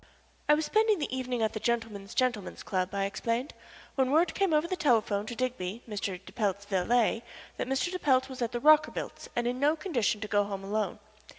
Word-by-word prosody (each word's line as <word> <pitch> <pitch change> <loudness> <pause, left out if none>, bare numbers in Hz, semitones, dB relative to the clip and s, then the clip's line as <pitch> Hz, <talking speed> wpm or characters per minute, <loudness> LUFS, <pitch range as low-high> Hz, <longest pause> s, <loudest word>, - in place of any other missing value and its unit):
"I 300 - +8
was 310 +1 -1
spending 435 -1 +3
the 295 -5 -3
evening 250 -3 -1
at 220 - +1
the 215 - -3
Gentlemen's 220 -4 -2
Gentlemen's 245 -7 -1
Club," 185 -2 -1
I 195 0 +1
explained, 230 +6 -2 0.4
"when 265 -2 +1
word 320 +4 +3
came 390 -3 +1
over 305 +2 +3
the 370 - -1
telephone 220 - +2
to 240 - -5
Digby, 235 -4 -3
Mr. 200 -4 -3
de - - -11
Pelt's 200 -3 -1
valet, 220 +4 +2 0.4
that - - -2
Mr. 270 +7 0
de 365 - -3
Pelt 260 -4 +3
was 260 -1 -8
at 235 - 0
the 240 - -2
Rockerbilts' 305 +3 +3
and 240 - 0
in 245 +1 -1
no 295 +3 +3
condition 250 - 0
to 215 - -3
go 205 0 +3
home 200 -1 -5
alone. 205 -1 -1
240 Hz, 210 wpm, -29 LUFS, 205-280 Hz, 0.4 s, I